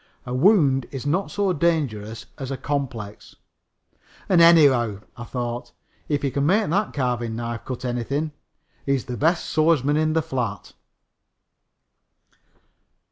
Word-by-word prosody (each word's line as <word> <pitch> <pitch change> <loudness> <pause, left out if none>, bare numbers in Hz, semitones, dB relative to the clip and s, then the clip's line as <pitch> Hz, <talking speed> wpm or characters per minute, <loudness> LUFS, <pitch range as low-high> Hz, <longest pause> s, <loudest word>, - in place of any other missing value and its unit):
A 125 - -5
wound 135 - +4
is 135 -1 -7
not 175 +7 0
so 200 -2 0
dangerous 130 -10 -1
as 135 -2 -5
a 135 - -3
complex. 125 -9 -5 0.9
"And, 180 -3 +4
anyhow," 135 -11 +5
I 120 - -8
thought, 120 -1 -5 0.4
"if 145 -2 0
he 140 - 0
can 140 +2 -1
make 205 +5 +3
that 200 +3 +1
carving 120 -4 -2
knife 115 0 -5
cut 130 0 -5
anything 135 +6 -2 0.5
he's 135 -2 0
the 125 - -5
best 165 +7 +1
swordsman 155 -2 +2
in 155 0 +1
the 160 -1 +1
flat." 115 -9 -4
135 Hz, 135 wpm, -23 LUFS, 120-160 Hz, 0.9 s, anyhow